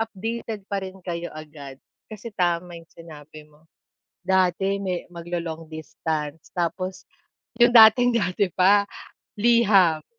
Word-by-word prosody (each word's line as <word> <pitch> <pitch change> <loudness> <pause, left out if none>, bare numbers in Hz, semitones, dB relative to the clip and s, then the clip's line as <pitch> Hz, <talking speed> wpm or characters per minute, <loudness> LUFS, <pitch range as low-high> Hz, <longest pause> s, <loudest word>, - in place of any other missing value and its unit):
updated 225 0 -5
pa 200 -1 -3
rin 190 0 -8
kayo 175 -1 -4
agad. 150 -3 -10 0.3
Kasi 215 +2 -9
tama 175 -1 -1
yung 165 - -21
sinabi 155 -2 -13
mo, 150 +1 -26 0.6
dati 190 +1 +1
may 185 -3 -4
maglo-long 170 -1 -6
distance 155 -1 -5
tapos 185 +2 -3 0.6
'yong 240 +1 +6
dating-dati 220 -4 +5
pa, 200 +4 +3 0.5
liham. 200 -8 +4
180 Hz, 110 wpm, -23 LUFS, 165-200 Hz, 0.6 s, yong